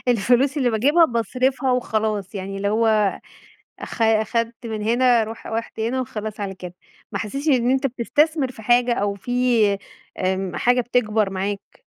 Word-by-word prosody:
الفلوس 245 +5 +2
اللي 255 -4 +2
باجِيبها 285 +10 +4
باصرَفها 255 +2 0
وخلاص، 215 -5 -1
يعني 195 0 -5
اللي 200 +1 -1
هو 215 -2 +2 0.6
أخ 230 - -5
أخَدت 230 +2 0
من 220 -2 -4
هنا، 240 +1 +3
روح 225 +1 -9
رُحت 225 0 -5
وهنا، 245 +4 -1
وخلاص 215 -3 -6
على 195 -1 -4
كده. 180 -1 -9 0.4
ما - - -2
حسِّيتش 275 +8 -4
إن 250 -4 +3
أنت 270 +1 +2
بتستثمِر 275 +3 0
في 225 - -12
حاجة 245 +2 +3
أو 200 -3 -1
في 235 -2 +1 0.4
آمم، 190 0 -1
حاجة 245 +1 +3
بتكبَر 220 -4 0
معاك. 200 - -5
230 Hz, 155 wpm, -22 LUFS, 210-250 Hz, 0.6 s, باجِيبها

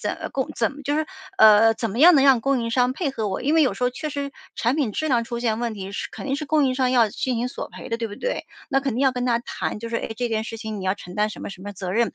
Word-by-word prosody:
怎 - - -2
么 - - -3
供 265 -1 -2
怎 225 - +1
么 290 +1 -11
就 290 - 0
是 310 - +1 0.3
呃， 220 +1 +7
怎 225 -2 -3
么 225 - -5
样 340 +3 +8
能 275 -1 +5
让 265 -4 +6
供 270 -1 +1
应 230 - -2
商 250 +1 +2
配 290 -1 -2
合 225 -5 -3
我。 190 - -3
因 290 +3 +1
为 320 - +6
有 255 - 0
时 250 - -7
候 250 - +2
确 310 +4 -5
实， 280 0 -3 0.3
产 240 +5 +1
品 255 -9 0
质 310 - -2
量 235 -3 +2
出 235 0 -5
现 225 -2 0
问 235 -2 -2
题 195 -1 -6
是 - - -3
肯 - - -7
定 270 +1 0
是 300 -1 -5
供 300 -1 +3
应 255 - 0
商 255 -1 +2
要 235 -4 +4
进 255 +3 -2
行 245 +2 -1
索 - - -6
赔 - - -9
的， 230 - -1
对 230 - -2
不 205 - -8
对？ - - -3 0.2
那 270 -2 +2
肯 270 -4 -2
定 245 - -1
要 270 -1 +4
跟 250 0 -2
他 235 -1 +2
谈， 210 - -4
就 230 - -5
是： 230 - -1
“哎， - - -5
这 245 -1 -1
件 220 -1 -1
事 225 - -6
情 215 -3 -5
你 - - -6
要 190 - +1
承 180 -3 -11
担 210 +1 +2
什 - - -9
么 - - -5
什 190 - -11
么 205 0 -6
责 185 -1 -5
任。” 235 +2 +1
240 Hz, 365 characters per minute, -23 LUFS, 220-275 Hz, 0.3 s, 样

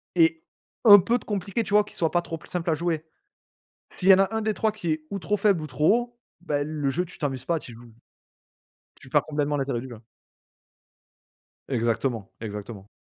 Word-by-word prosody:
et 330 0 +3 0.4
un 205 -2 +11
peu 235 +6 +1
compliqué 205 +2 -2
tu 205 - -6
vois, 210 0 +6
qu'il - - -11
soit 165 -2 +1
pas 175 - +2
trop 165 -1 -6
pl - - -17
simple 175 -1 -2
à 160 - +2
jouer. 165 -1 -2 0.9
S'il 190 - +1
y - - +11
en - - +3
a 195 +3 +1
un 220 - 0
des 215 -1 0
3 220 -1 0
qui 175 -7 -2
est 155 0 -4
ou 200 - -3
trop 210 +3 0
faible 195 -5 +2
ou - - -4
trop 155 +11 +3
haut, 240 0 -13 0.2
ben 145 -3 -1
le 145 -3 -1
jeu 180 +6 -1
tu 180 - -14
t'amuses 135 -4 -3
pas, 170 -1 0
tu - - -11
y - - -11
joues 120 0 -14 1.1
tu - - -14
perds - - +3
complètement 145 -1 -1
l'intérêt 135 -4 -1
du 130 - -9
jeu. 115 -2 -11 1.7
Exactement, 115 -2 -1
exactement. 105 -1 -7
165 Hz, 210 wpm, -25 LUFS, 135-205 Hz, 1.7 s, un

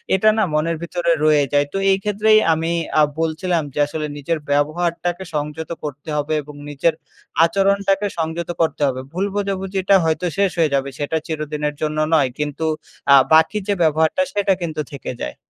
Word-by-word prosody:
এটা 215 +3 +4
না 220 - +3
মনের 160 +2 0
ভিতরে 170 0 -1
রয়েই 150 -2 +4
যায়। 145 0 +4
তো - - -1
এই 190 - +3
ক্ষেত্রেই 210 +1 +4
আমি 165 +1 -1 0.3
আ - - +7 0.2
বলছিলাম 165 +1 0
যে - - -4
আসলে, 155 +1 -4
নিজের 155 +3 -2
ব্যবহারটাকে 170 +4 0
সংযত 150 +2 -3
করতে 145 +1 -7
হবে 150 +1 -1
এবং 150 0 -12
নিজের 145 +3 +1 0.5
আচরণটাকে 195 +2 +1
সংযত 165 +1 -3
করতে 160 -2 0
হবে। 130 -1 -2
ভুল 185 +3 0
বোঝাবুঝিটা 195 -1 0
হয়তো 160 +3 0
শেষ 200 -1 +3
হয়ে 160 -4 +2
যাবে 140 0 -1
সেটা 145 +2 -1
চিরদিনের 150 -2 -3
জন্য 155 0 -1 0.2
নয়, 145 -5 +4
কিন্তু 150 +1 -2 0.5
আ - - +10 0.2
বাকি 160 +6 +5
যে 205 - +2
ব্যবহারটা 160 - +2
সেটা 200 -1 +2
কিন্তু 160 -3 -3
থেকে 140 - -6
যায়। 60 - -4
160 Hz, 170 wpm, -20 LUFS, 150-190 Hz, 0.5 s, আ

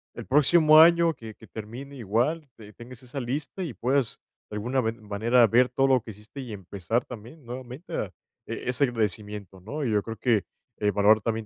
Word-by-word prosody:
el - - -7
próximo 155 +2 +6
año 170 0 +6
que 115 -6 -10
que - - -15
termine 120 +6 -9
igual, 125 +8 -1
te 105 -2 -13
tengas 120 +1 -12
esa 130 +2 -6
lista 140 +9 -4
y 150 -10 -5
puedas, 130 +4 0 0.3
de 105 - -7
alguna 125 +5 0
ven 115 0 -3
manera, 115 +4 +4
ver 125 +3 +4
todo 135 +2 +1
lo 130 -2 +4
que 110 - -12
hiciste 105 +6 -11
y 120 -4 -7
empezar 100 +3 -3
también 125 +5 -11
nuevamente 125 +5 -8
ah, - - -3 0.4
e - - -5
ese 130 +3 +2
agradecimiento, 105 -4 -3
¿no? 140 +8 -4
Y 115 - 0
yo 105 -1 +2
creo 115 +2 -7
que, 115 -7 +2 0.3
eh, 105 - +1
valorar 105 +2 +4
también 115 0 -2
120 Hz, 200 wpm, -26 LUFS, 105-135 Hz, 0.4 s, próximo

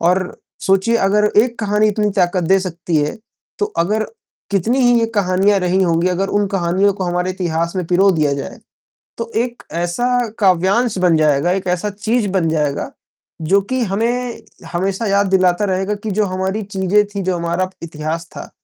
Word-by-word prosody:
और 180 +2 0 0.3
सोचिए 195 +5 +3
अगर 210 +1 +3 0.2
एक 240 -1 -4
कहानी 210 +1 +2
इतनी 210 0 0
ताकत 175 0 +1
दे 190 +4 +4
सकती 175 -2 -3
है, 150 0 0 0.4
तो 205 - +1
अगर 210 +6 +1 0.5
कितनी 205 +6 +1
ही 245 -1 +4
ये 230 - +2
कहानियाँ 195 +1 +2
रही 180 +1 +1
होंगी, 170 0 +2
अगर 185 +2 -1
उन 205 - +1
कहानियों 190 +3 +2
को 190 - -3
हमारे 180 +1 -1
इतिहास 170 -1 -2
में 180 - -1
पिरो 190 +3 +4
दिया 150 -4 +1
जाए, 140 - -6 0.6
तो 230 0 -5
एक 240 -1 -7 0.2
ऐसा 245 +6 0
काव्यांश 195 +4 +2
बन 175 -3 +3
जाएगा, 155 +2 +2
एक 190 0 -2
ऐसा 180 +4 0
चीज़ 210 +2 -1
बन 175 -4 +1
जाएगा 150 -3 -1 0.5
जो 195 +6 +3
कि 255 +6 -2
हमें 235 +5 -2 0.3
हमेशा 195 +5 -1
याद 200 0 +2
दिलाता 185 +1 +2
रहेगा 190 +2 -1
कि 220 - -2
जो 215 - +3
हमारी 190 +2 -2
चीज़ें 200 +1 +1
थी, 200 -1 -5
जो 185 -1 -1
हमारा 170 +2 -1
इतिहास 160 +1 -4
था, - - -8
190 Hz, 175 wpm, -18 LUFS, 175-210 Hz, 0.6 s, दे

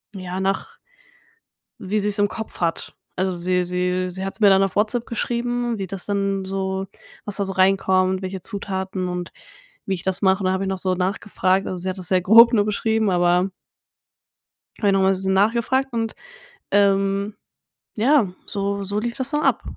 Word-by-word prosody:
ja, 185 -1 -5
nach 195 +1 -2 1.0
wie 205 0 -2
sie's 205 0 0
im 205 0 +3
Kopf 220 +1 -7
hat. 170 -2 -2 0.2
Also, 185 -1 -1
sie 180 +1 +1
sie 180 +1 -1
sie 190 +1 -5
hat's 195 +3 -6
mir 210 - +6
dann 195 0 +5
auf 195 -1 -1
WhatsApp 220 +3 +1
geschrieben, 240 0 -2
wie 195 - -3
das 190 0 -6
dann 195 -1 -1
so 190 0 -2 0.4
was 205 -2 -2
da 200 - -1
so 195 - -3
reinkommt, 190 0 +2
welche 190 0 -5
Zutaten 190 -2 -3
und 180 -1 -5 0.5
wie 195 - -2
ich 175 - -6
das 190 -1 -2
mache. 190 0 +3
Und 190 - -1
da 185 - +2
habe 190 +1 -1
ich - - -2
noch 190 0 -2
so 185 0 0
nachgefragt 190 0 0
also 185 - -3
sie 185 - -2
hat 185 - -6
das 180 -3 -2
sehr 185 -1 +2
grob 230 +6 +8
nur 205 -2 +3
beschrieben, 220 0 0
aber 180 +1 +2 1.3
dann - - -17
habe 205 - +4
ich - - +3
noch 195 - +3
mal 190 - +3
'n - - +4
bisschen 190 0 -1
nachgefragt 235 +6 +1
und, 225 -1 -2 0.6
ähm, 200 0 +2 0.6
ja 250 +2 +4 0.2
so 200 0 -2
so 200 +1 -2
lief 235 +1 -4
das 260 0 -3
dann 295 0 0
ab. - - +2
195 Hz, 195 wpm, -22 LUFS, 185-210 Hz, 1.3 s, grob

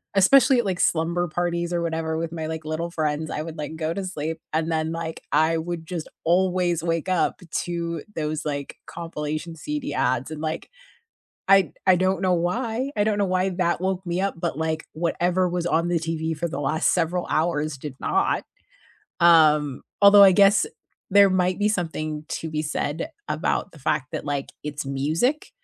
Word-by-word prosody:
especially, 250 +6 +6
like, 190 -5 -2
slumber 170 +2 +1
parties 170 +1 -2
or 170 - 0
whatever 160 -1 -2
with 165 0 -3
my, 160 -2 -4
like, 160 -1 -5
little 165 +2 -3
friends, 155 -1 -1
I 150 - -2
would, 165 0 -7
like, 150 +1 -5
go 160 0 -2
to 195 +2 -4
sleep 160 -3 -4
and 160 +1 0
then, 160 0 0
like, 165 -1 -5
I 160 +1 +3
would 165 0 -4
just 170 -2 -5
always 175 -1 +2
wake 165 +1 -1
up 185 +1 +1 0.2
to 170 -2 -3
those, 155 0 -3
like, 140 -2 -4
compilation 165 -1 -5
CD 295 - -4
ads 130 +2 0
and, 155 0 -6
like, 160 +1 -4 0.8
I 195 -2 +5 0.2
I 185 - +7
don't 185 +1 +1
know 185 -2 +3
why 230 +9 -1
I 205 - +2
don't 210 -1 +1
know 200 - +2
why 185 0 +1
that 175 -1 0
woke 190 0 -1
me 175 +1 -1
up, 195 -2 -1
but, 170 -3 -2
like, 160 -1 -2
whatever 175 +2 0
was 175 -1 -2
on 170 0 +1
the 175 0 +1
TV 160 0 -3
for 170 - -1
the 145 -3 -5
last 155 +3 +1
several 175 0 0
hours 155 -2 0
did 135 -1 -7
not. - - +1 0.8
Um, 150 -5 +5 0.2
although 200 0 +9
I 195 - +8
guess 200 +2 +5 0.5
there 200 0 +7
might 185 0 +1
be 210 - +2
something 155 -6 -3
to 160 - -4
be 155 0 -2
said 155 - -3 0.2
about 200 - -1
the 160 - -15
fact 135 -1 0
that, - - -4
like, 140 -1 -2
it's 150 0 -4
music, 155 - 0
170 Hz, 185 wpm, -24 LUFS, 155-185 Hz, 0.8 s, although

